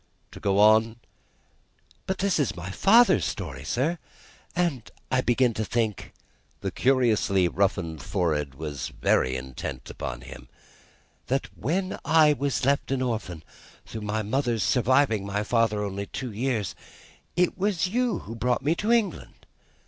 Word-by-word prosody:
To - - -10
go 100 -1 +1
on 110 +2 +5 0.6
" - - -35
"But 190 - -1
this 195 -3 +1
is 140 - 0
my 90 +2 -6
father's 210 - +5
story, - - -4
sir; 155 +8 -1 0.6
and 165 -9 -1 0.2
I 130 0 +3
begin 120 -1 +2
to 110 - -2
think" 110 -3 -2 0.5
the - - -2
curiously 115 -8 +2
roughened 90 -5 -1
forehead 80 -7 -1
was 75 -2 -5
very 65 0 +1
intent 65 0 -6
upon - - -6
him 65 - -11 0.8
"that - - -2
when 185 - -2
I 160 -2 +5
was 140 -1 -1
left 140 +1 +1
an 130 -1 0
orphan 105 -9 -3 0.4
through 110 - -7
my 105 +1 -2
mother's 115 -1 0
surviving 125 +2 +2
my 100 +1 -2
father 110 -2 +1
only 100 0 -4
two 125 -2 -5
years, 110 -3 -1 0.6
it 180 0 +2
was 190 -2 0
you 235 +1 0
who 110 - -7
brought 120 +2 0
me 150 +4 +3
to 215 +2 0
England. 225 -6 -1
115 Hz, 150 wpm, -26 LUFS, 100-140 Hz, 0.8 s, on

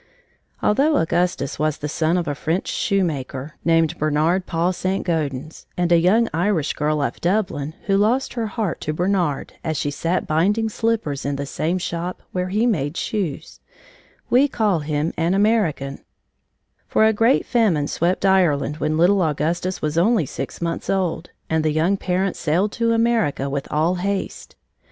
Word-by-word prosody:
Although 280 +8 +3
Augustus 170 -3 0
was 155 -1 0
the 150 - -4
son 160 +3 0
of 175 - -2
a 145 - 0
French 165 +5 -2
shoemaker, 150 -7 -1
named 165 0 +2
Bernard 155 +5 +1
Paul 170 +2 0
St. 185 +2 -2
Gaudens, 155 -3 -3
and 175 -1 +1
a 170 - +6
young 215 +7 +3
Irish 170 -3 +1
girl 150 0 0
of - - -3
Dublin, 175 -6 -1
who 195 - +2
lost 230 +6 +1
her 230 -2 -2
heart 210 +1 -3
to 155 - -2
Bernard 175 -4 -1
as 160 -2 -2
she 145 - -1
sat 170 +5 -1
binding 205 +8 +1
slippers 220 - -1
in 140 +1 -1
the 140 +1 -3
same 165 +5 -1
shop 175 0 -4
where 180 0 -2
he 210 +5 +1
made 160 - 0
shoes, 190 -10 -3 0.7
we 260 +4 +4
call 215 - +1
him 150 +1 -2
an 170 +3 +1
American, 195 -10 +1 0.9
for 220 - +3
a 220 - +4
great 230 +5 +3
famine 195 - +2
swept 175 +5 0
Ireland 165 -6 +2
when 155 0 -1
little 185 +4 +4
Augustus 165 +4 -1
was 155 +2 +1
only 210 -2 +3
six - - -6
months 170 0 -3
old, 180 -3 -1 0.2
and 160 -1 0
the 155 - +2
young 165 +6 +2
parents 185 0 -1
sailed 175 +6 +1
to 230 +1 0
America 225 - +1
with 140 -1 -3
all 160 +4 +2
haste. 195 +2 -3
175 Hz, 165 wpm, -21 LUFS, 155-200 Hz, 0.9 s, a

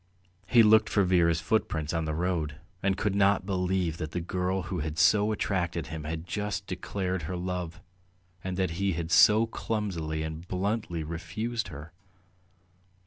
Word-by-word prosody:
He 120 +1 +6
looked 110 0 +5
for 100 - +3
Vera's 85 -3 +3
footprints 80 -5 0
on 80 -1 0
the 75 -1 -2
road, 80 -4 -1 0.3
and 95 0 +1
could 105 -1 0
not 100 -1 +3
believe 90 -3 0
that 80 -2 -5
the 90 - -1
girl 90 +2 -1
who 90 0 -4
had 80 +1 -3
so 105 +7 +4
attracted 85 -5 -1
him 80 -2 -5
had 80 +1 -4
just 105 +1 -3
declared 95 0 -3
her 90 - -2
love, 90 -2 -4 0.6
and 95 -1 -3
that 95 -3 0
he 100 -1 +2
had 80 0 -4
so 110 +5 +7
clumsily 90 -9 -3
and 80 +2 -6
bluntly 95 -2 -2
"refused" 95 +9 -3
her. 80 -2 -10
90 Hz, 160 wpm, -28 LUFS, 80-100 Hz, 0.6 s, so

